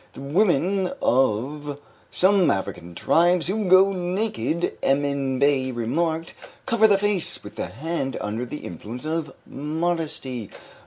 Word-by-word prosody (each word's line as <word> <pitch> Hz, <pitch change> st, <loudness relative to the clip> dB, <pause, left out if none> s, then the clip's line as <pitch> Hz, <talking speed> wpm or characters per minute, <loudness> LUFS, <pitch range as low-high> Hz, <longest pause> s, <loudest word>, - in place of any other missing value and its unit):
The -, -, -10 dB
women 180 Hz, +4 st, +2 dB
of 135 Hz, +4 st, 0 dB, 0.3 s
some 190 Hz, -1 st, +3 dB
African 90 Hz, -3 st, -3 dB
tribes 175 Hz, -, +3 dB
who 205 Hz, +4 st, -1 dB
go 190 Hz, +2 st, +6 dB
naked, 180 Hz, -, -1 dB
Emin 140 Hz, -1 st, +1 dB
Bey 135 Hz, -1 st, +2 dB
remarked, 160 Hz, +8 st, -1 dB, 0.3 s
cover 220 Hz, -1 st, +4 dB
the 200 Hz, -2 st, +4 dB
face 200 Hz, -3 st, -2 dB
with 105 Hz, -, -10 dB
the -, -, -3 dB
hand 140 Hz, +1 st, -3 dB
under 110 Hz, +4 st, -3 dB
the 150 Hz, -, -7 dB
influence 110 Hz, -, -7 dB
of 155 Hz, -2 st, -2 dB
modesty. 150 Hz, -, -3 dB
150 Hz, 125 wpm, -24 LUFS, 130-180 Hz, 0.3 s, go